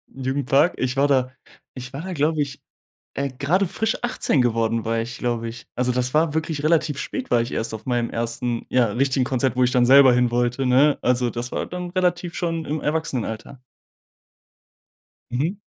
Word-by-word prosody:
Jugendpark, 135 +4 +1
ich 130 +1 -2
war 140 +1 +4
da 130 -2 +1 0.4
ich 130 +1 -9
war 140 - -5
da, 185 0 -5
glaube 150 0 +1
ich, 140 -1 -4 0.5
äh, 140 0 -1
grade 155 +9 0
frisch 220 +5 -1
18 240 - +1
geworden, 115 -1 0
war 115 0 0
ich, 120 +1 -6
glaube 120 -2 -2
ich. 120 - -11
Also, 125 0 +1
das 125 +1 -1
war 155 0 +2
wirklich 160 -2 -2
relativ 155 -3 +2
spät, 260 -1 -5
war 120 - +4
ich 115 - -4
erst 110 0 -3
auf 110 0 -7
meinem 120 -2 0
1. 115 +1 -3
ja, 125 -2 +3
richtigen 130 +3 +1
Konzert, 130 -1 0
wo 125 - +3
ich 125 - +2
dann 125 -1 +3
selber 135 -1 +7
hin 125 -1 +2
wollte, 120 +2 0
ne? 135 +4 +4
Also, 125 -1 +1
das 120 +1 -5
war - - -2
dann 180 0 -6
relativ 175 -2 0
schon 165 -2 -2
im 155 +1 -2
Erwachsenenalter. 135 -5 -3 1.7
Mhm. 160 +11 -1
130 Hz, 185 wpm, -22 LUFS, 120-155 Hz, 1.7 s, selber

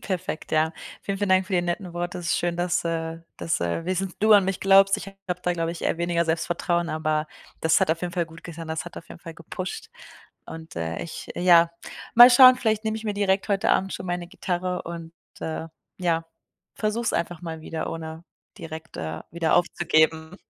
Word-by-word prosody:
Perfekt, 185 -3 -4
ja. 160 +1 +2 0.3
Vielen, 195 -1 -3
vielen 205 0 -1
Dank 185 0 +4
für 200 - -8
die 175 -1 +3
netten 175 +1 -3
Wort, 175 +1 -3
es 175 -1 -5
ist - - +2
schön, 175 -1 -1
dass, 175 0 0
äh 165 -1 -2 0.2
dass, 165 - -1
äh, 85 - -1
wenigstens 185 +1 -2
du 215 +1 +5
an 205 -2 +7
mich 190 -1 -2
glaubst, 195 0 +6
ich - - -8
habe 195 -2 -6
da 180 - +1
glaube 165 -1 -1
ich 170 - -9
eher 165 - 0
weniger 170 0 +1
Selbstvertrauen. 170 +1 0
Aber 155 -1 -1 0.3
das 160 0 +3
hat - - +3
auf 165 +1 0
jeden 175 -1 -3
Fall 175 -2 -1
gut 165 +1 -14
getan, 165 -1 -8
das 160 0 -3
hat 175 - -10
auf - - -9
jeden - - -11
Fall 165 -2 -9
gepusht. 185 - -6 0.6
Und, 160 0 -10
äh, 85 0 -3
ich 165 - -8
ja, 170 -1 +5 0.4
mal 240 +1 +11
schauen, 255 +1 +9
vielleicht 220 -3 0
nehme 220 0 -1
ich 220 - -9
mir 210 -2 -2
direkt 200 0 +1
heute 195 -1 +1
Abend 195 0 +2
schon - - -6
meine 175 0 -3
Gitarre 180 0 -3
und, 165 -1 -8 0.3
äh, 160 0 -4 0.3
ja, 165 -3 0 0.5
versuche 215 +2 -1
es 230 - 0
einfach 170 -1 -2
mal 160 -2 -6
wieder 160 0 -4
ohne 160 0 -7 0.3
direkt, 160 0 -8
äh, 80 0 -4
wieder 165 -1 +1
aufzugeben. 160 -1 +2
175 Hz, 210 wpm, -25 LUFS, 165-190 Hz, 0.6 s, mal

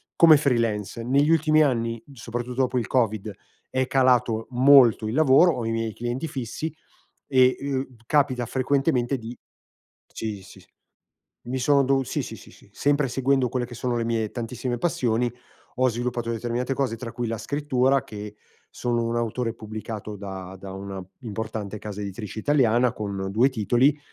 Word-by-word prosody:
come 160 -3 +8
freelance. 115 -5 0
Negli 140 +5 +2
ultimi 155 -1 +4
anni, 115 -5 0
soprattutto 120 +1 -4
dopo 130 -1 +1
il 115 - -4
COVID, 110 -4 0 0.4
è 130 0 0
calato 125 -4 +2
molto 125 -3 +6
il 110 - -3
lavoro, 155 +4 +5
ho 120 -3 -3
i 115 - -1
miei 115 -1 -2
clienti 120 +7 -3
fissi 140 +3 -4 0.5
e, 130 -2 +4
uhm, 135 -2 -3
capita 130 -4 +2
frequentemente 135 0 +1
di 120 +1 -8 0.8
ci 105 -3 -4
si - - -15 0.8
mi 130 +2 -3
son 140 +1 +3
dovu 135 0 +2
sì, - - -2
sì, - - -7
sì, - - -15
sì, - - -20
sempre 145 -1 +1
seguendo 130 0 +1
quelle 125 0 -1
che 120 - -10
sono 120 +1 -1
le 115 - -1
mie 115 -2 -1
tantissime 120 +1 -4
passioni 120 -5 0 0.5
ho 130 0 +3
sviluppato 120 0 -3
determinate 120 +3 -2
cose, 130 -4 -1
tra 115 0 -7
cui 120 0 -3
la 115 0 -2
scrittura, 135 0 +1
che 105 0 -8 0.3
sono 120 -1 -1
un 115 0 -1
autore 115 0 -1
pubblicato 110 -1 -7
da 95 -2 -7
da 95 0 -9
una 95 -1 -6 0.2
importante 110 -2 -5
casa 105 -1 -7
editrice 105 +2 -6
italiana 125 -3 +3
con 100 -2 -4
2 120 +6 +4
titoli 130 +4 +2
120 Hz, 160 wpm, -25 LUFS, 110-130 Hz, 0.8 s, come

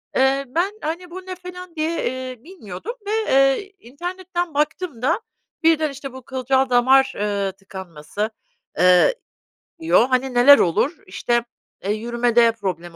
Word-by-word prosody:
Eee, 270 +1 +2
ben, 340 +10 0
hani, 335 +4 -4
bu 370 +2 -9
ne 370 0 -6
falan 360 -1 -10
diye, 315 +1 -1
eee, 255 -2 -5
bilmiyordum 340 - -8
ve, 410 - -3 0.2
eee, 275 +9 +2
internetten 350 +5 -5
baktım 300 -2 -2
da 320 - +1 0.4
birden, 320 -1 +3
işte, 275 -1 -8
bu 260 - -9
kılcal 265 0 0
damar, 265 +2 +4
ııı, 200 -1 -1
tıkanması, 190 0 -6 0.5
eee, 180 - +5 0.6
diyor. 325 -7 +4
Hani, 260 0 0
neler 255 +4 +8
olur? 260 - +1
İşte, 235 +5 0 0.4
eee, 200 - -1
yürümede 235 +1 +2
problem 180 -6 -5
265 Hz, 140 wpm, -21 LUFS, 230-330 Hz, 0.6 s, neler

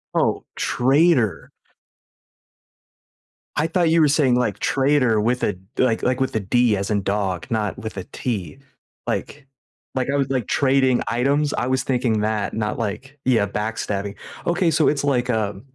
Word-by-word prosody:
Oh, - - +1
traitor. 135 - +2 2.1
I 155 +2 +2
thought 170 0 +1
you 165 0 +4
were 150 - +5
saying, 140 -4 +3
like, 110 -5 0
trader 130 -6 +2
with 125 +3 0
a, 105 - +1 0.2
like 120 -3 +1
like, 130 +1 +1
with 130 -3 -1
a - - +2
D 120 +3 +2
as 100 +2 -3
in 100 -2 0
dog, 95 -4 -1
not 110 -3 -1
with 110 -2 -7
a 95 - -3
T. 95 - -4 0.5
Like 140 -1 -4 0.5
like, 130 +1 -1
I - - +2
was, 135 -1 0
like, 130 -5 -1
trading 130 -2 +2
items 140 +5 +1
I 125 - -1
was 130 0 0
thinking 120 -4 0
that, 105 -1 -1
not 105 -1 -2
like 130 +7 -4
yeah, 115 -5 +3
backstabbing, 105 -1 -3 0.3
okay 175 0 +2
so 155 0 +3
it's 145 - -1
like 125 -3 +1
a 105 -4 -1
125 Hz, 165 wpm, -22 LUFS, 105-140 Hz, 2.1 s, were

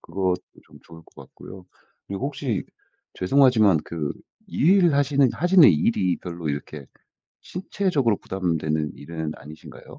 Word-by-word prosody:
그것도 90 +1 -2 0.2
좀 - - -18
좋을 80 0 -15
것 - - -25
같고요. 95 -1 -13 0.4
그리고 100 +8 -4
혹시 135 -8 -3 0.5
죄송하지만 110 - +4
그 75 -4 -4 0.4
일을 175 0 +3
하시는 140 -1 +3
하시는 175 0 +5
일이 90 +3 +1
별로 85 -3 -6
이렇게 70 0 -5 0.6
신체적으로 175 - -1
부담되는 80 -5 -2
일은 80 0 -6
아니신가요? 75 +3 -13
95 Hz, 310 characters per minute, -23 LUFS, -, 0.6 s, 하시는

